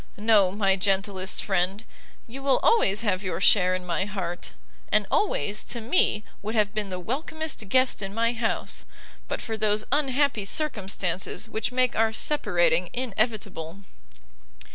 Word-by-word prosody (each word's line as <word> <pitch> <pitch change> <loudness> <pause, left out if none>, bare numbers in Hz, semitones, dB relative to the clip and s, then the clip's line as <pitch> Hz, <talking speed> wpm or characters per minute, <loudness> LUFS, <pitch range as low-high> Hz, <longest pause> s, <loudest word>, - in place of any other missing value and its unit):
no, 205 -3 +4
my 195 -1 +2
gentlest 195 0 0
friend, 190 +2 0 0.4
you 260 +4 -9
will 270 -1 +3
always 210 - +3
have 200 -5 0
your 185 -4 -3
share 185 -2 +5
in 185 -1 -5
my 175 +1 -1
heart; 185 -4 -5 0.4
and - - +3
always, 210 - 0
to 240 - -2
me, 225 -3 +1 0.2
would 215 +3 -4
have 210 -1 +2
been 210 -2 -2
the 185 - -4
welcomest 275 - -4
guest 255 +1 +3
in 195 -1 -4
my 230 +3 0
house, 225 -1 -3 0.4
but - - -4
for 225 - -3
those 215 0 +2
unhappy 275 -5 +1
circumstances 195 - -2
which 220 +1 -3
make 255 -1 +1
our 225 0 +2
separating 175 - +1
inevitable." 210 -7 -3
210 Hz, 145 wpm, -26 LUFS, 190-235 Hz, 0.4 s, share